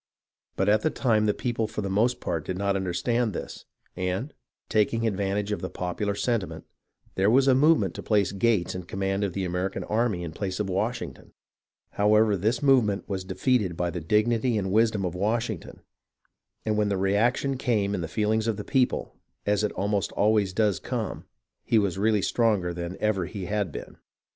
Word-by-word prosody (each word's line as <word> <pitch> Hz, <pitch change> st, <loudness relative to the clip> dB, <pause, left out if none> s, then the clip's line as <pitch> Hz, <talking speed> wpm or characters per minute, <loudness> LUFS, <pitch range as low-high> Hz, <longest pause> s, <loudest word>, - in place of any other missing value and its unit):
But 95 Hz, -, 0 dB
at 105 Hz, +1 st, +4 dB
the 155 Hz, -, +2 dB
time 110 Hz, -7 st, +1 dB
the 105 Hz, -, +3 dB
people 115 Hz, -3 st, -1 dB
for 105 Hz, -, -4 dB
the -, -, -2 dB
most 120 Hz, +5 st, +2 dB
part 85 Hz, -3 st, -2 dB
did 90 Hz, +3 st, -4 dB
not 100 Hz, 0 st, 0 dB
understand 100 Hz, +5 st, 0 dB
this, -, -, -7 dB, 0.3 s
and, 95 Hz, +10 st, -2 dB, 0.3 s
taking 115 Hz, +2 st, +1 dB
advantage 100 Hz, 0 st, -1 dB
of 105 Hz, -, -2 dB
the 95 Hz, -, -3 dB
popular 100 Hz, +3 st, -2 dB
sentiment, 115 Hz, -3 st, -2 dB, 0.5 s
there 95 Hz, +2 st, +2 dB
was 130 Hz, +4 st, +4 dB
a 135 Hz, -, +6 dB
movement 135 Hz, -, +4 dB
to -, -, -6 dB
place 105 Hz, -3 st, +2 dB
Gates 100 Hz, -2 st, +1 dB
in 90 Hz, -1 st, -6 dB
command 95 Hz, +2 st, -2 dB
of 100 Hz, -3 st, -1 dB
the 95 Hz, 0 st, -2 dB
American 90 Hz, +2 st, -2 dB
army 110 Hz, -5 st, 0 dB
in 85 Hz, -, -5 dB
place 95 Hz, +3 st, -4 dB
of 105 Hz, -, -1 dB
Washington. 115 Hz, +5 st, -3 dB, 0.6 s
However, 105 Hz, +1 st, +3 dB
this 110 Hz, +7 st, 0 dB
movement 120 Hz, -8 st, +3 dB
was 95 Hz, -2 st, -3 dB
defeated 95 Hz, -1 st, 0 dB
by 90 Hz, -1 st, -1 dB
the 85 Hz, 0 st, -4 dB
dignity 110 Hz, +6 st, +2 dB
and 95 Hz, -2 st, -2 dB
wisdom 110 Hz, -2 st, +2 dB
of 90 Hz, -, -2 dB
Washington, 110 Hz, +1 st, -2 dB, 0.8 s
and 110 Hz, -1 st, 0 dB
when 105 Hz, -1 st, +2 dB
the 100 Hz, -, 0 dB
reaction 110 Hz, +8 st, +1 dB
came 110 Hz, -6 st, 0 dB
in 90 Hz, -, -2 dB
the 85 Hz, -, -3 dB
feelings 110 Hz, +5 st, 0 dB
of 110 Hz, -3 st, 0 dB
the 105 Hz, -, -5 dB
people, 130 Hz, +1 st, 0 dB, 0.3 s
as 105 Hz, 0 st, +1 dB
it 105 Hz, -, +1 dB
almost 100 Hz, +1 st, -1 dB
always 105 Hz, -2 st, +2 dB
does 105 Hz, -2 st, +1 dB
come, -, -, -4 dB, 0.4 s
he 115 Hz, -, +2 dB
was 100 Hz, -3 st, +1 dB
really 105 Hz, -1 st, +2 dB
stronger 105 Hz, -7 st, +1 dB
than 85 Hz, +1 st, -5 dB
ever 100 Hz, -5 st, 0 dB
he 95 Hz, -1 st, -6 dB
had 100 Hz, -2 st, -1 dB
been. -, -, -8 dB
105 Hz, 185 wpm, -26 LUFS, 95-110 Hz, 0.8 s, a